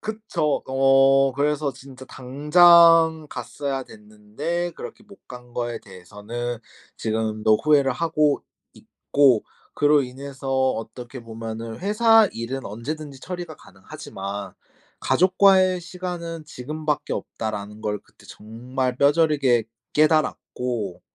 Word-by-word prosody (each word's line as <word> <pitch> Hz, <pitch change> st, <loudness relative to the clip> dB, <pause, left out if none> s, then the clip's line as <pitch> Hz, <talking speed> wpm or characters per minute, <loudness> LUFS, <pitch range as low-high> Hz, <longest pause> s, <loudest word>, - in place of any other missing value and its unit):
그쵸. 215 Hz, -9 st, -2 dB
어 135 Hz, 0 st, +4 dB
그래서 145 Hz, +1 st, 0 dB
진짜 130 Hz, 0 st, -13 dB
당장 160 Hz, +4 st, +5 dB
갔어야 135 Hz, +3 st, -4 dB
됐는데 110 Hz, +13 st, -5 dB
그렇게 215 Hz, -, -10 dB
못 200 Hz, -1 st, -18 dB
간 125 Hz, -1 st, -12 dB
거에 120 Hz, -1 st, -3 dB
대해서는 105 Hz, +6 st, -7 dB, 0.4 s
지금도 110 Hz, -1 st, +1 dB
후회를 145 Hz, -3 st, +4 dB
하고 155 Hz, 0 st, +1 dB, 0.3 s
있고 135 Hz, -6 st, +1 dB, 0.3 s
그로 145 Hz, -1 st, +4 dB
인해서 135 Hz, +1 st, -7 dB, 0.2 s
어떻게 120 Hz, +3 st, -8 dB
보면은 115 Hz, 0 st, -7 dB
'회사 220 Hz, +2 st, +4 dB
일은 125 Hz, +4 st, -5 dB
언제든지 140 Hz, +6 st, -7 dB
처리가 175 Hz, -2 st, -7 dB
가능하지만 100 Hz, 0 st, -8 dB, 0.5 s
가족과의 185 Hz, 0 st, +4 dB
시간은 175 Hz, -2 st, -6 dB
지금밖에 150 Hz, +1 st, -4 dB
없다.'라는 105 Hz, -1 st, -6 dB
걸 105 Hz, -1 st, -2 dB
그때 -, -, -22 dB
정말 125 Hz, +4 st, -4 dB
뼈저리게 140 Hz, -5 st, +3 dB, 0.3 s
깨달았고 125 Hz, -, 0 dB
135 Hz, 260 characters per minute, -23 LUFS, 115-160 Hz, 0.5 s, 당장